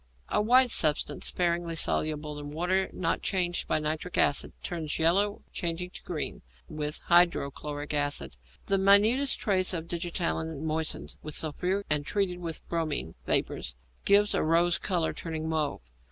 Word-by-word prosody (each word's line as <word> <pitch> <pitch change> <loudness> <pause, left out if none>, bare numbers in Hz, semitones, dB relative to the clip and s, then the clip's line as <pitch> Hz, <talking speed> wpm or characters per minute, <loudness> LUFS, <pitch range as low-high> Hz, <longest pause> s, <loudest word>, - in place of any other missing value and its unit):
_ - - 0
A - - +4
white 250 +3 +5
substance, 155 -7 +3
sparingly 170 -1 0
soluble 150 -1 -1
in 145 0 -7
water, 180 +5 0
not 165 -3 -1
changed 175 -2 0
by - - +2
nitric 155 +3 -3
acid; 140 - +2
turns 160 -4 -3
yellow, 195 +6 +2
changing 180 0 -2
to - - -9
green, 160 -4 -4 0.3
with 150 0 -4
hydrochloric 150 -4 +1
acid. 145 - 0 0.3
The 195 0 +1
minutest 215 +8 +4
trace 185 -3 +1
of 165 0 -5
digitalin 170 -3 -2
moistened 160 0 -3
with 155 -1 -5
sulphuric 180 +6 -1
and 150 -1 0
treated 180 +1 -1
with 165 -2 -6
bromine 155 - -2
vapour - - +1 0.4
gives 205 +1 +4
a - - +1
rose 170 +2 +2
colour, 175 -4 0
turning 160 -2 -5
to 160 - -3
mauve. 155 - -1
165 Hz, 155 wpm, -28 LUFS, 155-185 Hz, 0.4 s, white